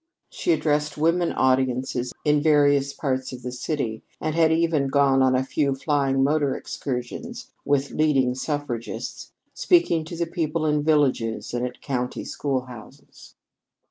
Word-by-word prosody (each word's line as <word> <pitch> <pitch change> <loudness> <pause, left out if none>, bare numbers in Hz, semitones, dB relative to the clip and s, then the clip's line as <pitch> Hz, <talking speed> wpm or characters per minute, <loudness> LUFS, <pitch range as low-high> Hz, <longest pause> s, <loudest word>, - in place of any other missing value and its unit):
She 355 - -1
addressed 150 - 0
women 170 +3 +2
audiences 130 -1 0
in 150 -1 +3
various 145 -2 +3
parts 130 -3 -2
of 125 -1 -9
the 125 - -4
city, 125 -3 -3 0.2
and 155 0 -2
had 160 0 +3
even 160 -4 +2
gone 135 -1 +3
on 130 -1 +4
a 130 - +2
few 140 0 0
flying 135 -1 +1
motor 145 -1 +1
excursions 145 - -6
with 140 -1 +1
leading 135 -5 +2
suffragists, 130 -3 -4 0.2
speaking 340 - +3
to 170 - -7
the 170 - 0
people 165 -2 -2
in 150 -1 +2
villages 140 -9 +1
and 120 0 -1
at 125 - -12
country 125 -3 -3
schoolhouses. 130 -5 -6
140 Hz, 140 wpm, -24 LUFS, 130-155 Hz, 0.2 s, on